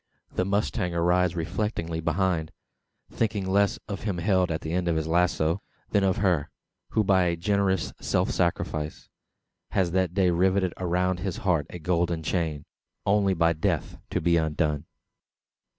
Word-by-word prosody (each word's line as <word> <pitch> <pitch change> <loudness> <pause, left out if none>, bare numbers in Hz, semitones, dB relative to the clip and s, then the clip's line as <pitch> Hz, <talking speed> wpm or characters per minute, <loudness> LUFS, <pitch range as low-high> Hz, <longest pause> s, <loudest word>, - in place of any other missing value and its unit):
The 90 - 0
mustanger 90 -4 0
rides 90 0 +3
reflectingly 85 -1 -2
behind; 85 -1 0 0.6
thinking 105 -3 -1
less 100 +1 +2
of 100 -2 -5
him 100 -4 -2
held 90 0 +2
at 80 -1 -2
the 80 - -4
end 90 0 0
of 85 - +2
his 80 -1 0
lazo, 85 +1 +1 0.3
than 100 -2 +3
of 95 +2 +2
her, 90 -8 +1 0.4
who 110 - +3
by 95 -2 +4
a 85 -1 +1
generous 95 0 0
self - - +1
sacrifice, 80 -3 -2 0.6
has 90 -3 +2
that 90 -1 0
day 95 -3 +3
riveted 95 +1 +2
around 90 0 0
his 95 -1 -3
heart 85 -6 +2
a - - -7
golden 85 0 0
chain 80 -4 -1 0.4
only 100 -1 +3
by 85 0 +3
death 80 - -2
to - - 0
be 85 0 +3
undone! 75 -1 0
90 Hz, 155 wpm, -26 LUFS, 85-95 Hz, 0.6 s, by